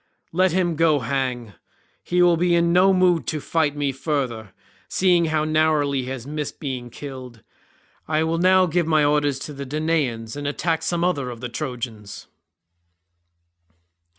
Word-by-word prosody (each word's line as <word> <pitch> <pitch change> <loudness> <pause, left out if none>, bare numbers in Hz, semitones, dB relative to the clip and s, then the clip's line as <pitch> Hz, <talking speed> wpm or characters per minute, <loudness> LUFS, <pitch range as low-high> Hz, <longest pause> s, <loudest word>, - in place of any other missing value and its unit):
Let 185 +2 +2
him 175 -1 0
go 155 -3 +3
hang; 125 -3 -2 0.5
he 180 0 +1
will 175 -1 +5
be 175 +1 +2
in 170 0 +2
no 185 +2 +5
mood 180 -7 +2
to 155 - -2
fight 150 -1 0
me 145 -1 -1
further, 130 -7 -3 0.4
seeing 180 -2 +3
how 155 -1 0
narrowly 155 -3 +1
he - - -6
has 130 -3 -6
missed 150 +1 -5
being 130 -4 -5
killed. 130 -3 -9 0.6
I 155 0 +1
will 165 +1 -1
now 185 +1 +5
give 170 -1 0
my 155 -2 +3
orders 145 -2 +1
to 150 - -6
the 140 0 -6
Danaans 140 -6 -2
and 145 0 -4
attack 160 +2 -1
some 170 +1 -1
other 145 -8 0
of 120 -2 -8
the 125 +1 -5
Trojans." 120 -6 -6
150 Hz, 160 wpm, -22 LUFS, 130-170 Hz, 0.6 s, will